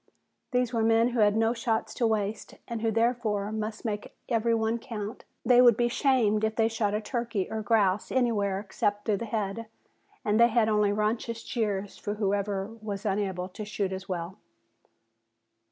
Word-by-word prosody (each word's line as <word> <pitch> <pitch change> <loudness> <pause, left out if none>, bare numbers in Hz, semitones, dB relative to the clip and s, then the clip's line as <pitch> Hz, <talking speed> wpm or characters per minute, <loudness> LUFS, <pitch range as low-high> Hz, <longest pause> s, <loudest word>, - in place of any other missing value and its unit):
These 250 -2 0
were 230 - +1
men 225 +1 +4
who 240 -1 -2
had 210 0 +4
no 225 +1 +3
shots 230 -1 -1
to 235 - +1
waste 210 -1 -2
and 230 -2 -4
who 225 - +1
therefore 225 -3 0
must 220 +1 -4
make 210 -2 -4
every 230 -1 +2
one 225 +1 0
count. 225 -1 -6 0.2
They 245 +1 +6
would 240 -3 +6
be 240 0 +2
shamed 235 -5 +2
if 220 0 0
they 225 -1 +3
shot 215 -2 0
a 210 - -1
turkey 230 -4 -2
or 220 - -2
grouse 205 -2 +2
anywhere 210 -6 +1
except 205 0 -2
through 210 -2 +1
the 230 - -4
head 220 0 -3 0.6
and 210 +1 +2
they 235 - +8
had 230 -1 +2
only 210 -2 +3
raucous 220 +2 -1
jeers 205 -5 -2
for 205 0 -3
whoever 200 -1 -1 0.2
was 205 -2 -5
unable 190 -3 -1
to 205 +3 -7
shoot 205 -2 -2
as 190 +1 -7
well. 175 0 -4
220 Hz, 180 wpm, -28 LUFS, 205-230 Hz, 0.6 s, they